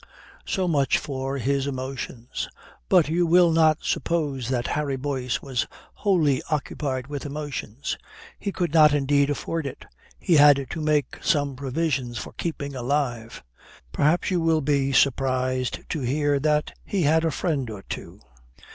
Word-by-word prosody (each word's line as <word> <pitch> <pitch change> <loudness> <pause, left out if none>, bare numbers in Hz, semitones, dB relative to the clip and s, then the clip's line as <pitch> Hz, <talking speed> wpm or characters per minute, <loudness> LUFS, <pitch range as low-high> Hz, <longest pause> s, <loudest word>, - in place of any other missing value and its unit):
So 185 -1 0
much 140 -6 +2
for 135 -1 -3
his 140 +2 0
emotions. 130 -2 -5 0.4
But 180 -5 +5
you 170 +2 +1
will 175 0 +5
not 160 -1 +3
suppose 145 -6 -1
that 125 -2 0
Harry 145 -2 -1
Boyce 130 -2 -2
was 130 -4 -1 0.3
wholly 165 -10 +2
occupied 140 -4 -2
with 145 0 -5
emotions. 145 -4 -5 0.4
He 200 - -3
could 175 -5 -2
not 155 -2 +6
indeed 140 0 +2
afford 155 +1 -2
it. 135 - -8 0.3
He 170 - +3
had 145 -1 +6
to 160 - -4
make 150 -2 0
some 145 -2 +1
provision 135 -2 -2
for - - -6
keeping 145 -4 -4
alive. 125 -3 -2 0.5
Perhaps 160 - +2
you 180 -2 +1
will 165 -1 +2
be 140 -1 +1
surprised 130 -2 +1
to 155 - -2
hear 145 +2 +1
that 150 +1 +1
he 195 -4 -1
had 160 +2 +3
a 165 - +2
friend 150 -7 -1
or 105 -3 -8
two. - - -8
145 Hz, 150 wpm, -25 LUFS, 130-155 Hz, 0.5 s, not